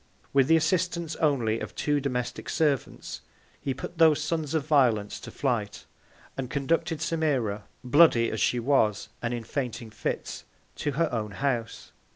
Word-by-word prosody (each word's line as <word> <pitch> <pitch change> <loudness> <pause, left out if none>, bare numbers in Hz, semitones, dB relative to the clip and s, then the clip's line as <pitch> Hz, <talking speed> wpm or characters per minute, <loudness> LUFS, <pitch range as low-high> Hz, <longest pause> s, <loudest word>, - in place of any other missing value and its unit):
With 135 -2 +4
the 165 - +6
Assistance 170 0 0
only 120 -8 +1
of - - -7
two 145 -1 +1
domestic 125 -3 -3
Servants, 145 -5 -1 0.4
he 135 - -2
put 170 - -8
those 160 -2 +6
Sons 160 -1 -2
of 150 -3 0
Violence 120 -9 +2
to - - -9
Flight, 115 -7 -2 0.5
and 130 -2 -4
conducted 160 +3 0
Semira, 130 -11 0 0.2
bloody 125 -3 +5
as 110 - -3
she 125 - +2
was, 115 -5 +2
and 120 - -1
in 120 -1 -3
fainting 120 -2 -4
Fits, - - -4 0.3
to 145 - -2
her 165 +4 +2
own 105 -3 -2
House. 120 -1 -2
135 Hz, 155 wpm, -27 LUFS, 115-155 Hz, 0.5 s, the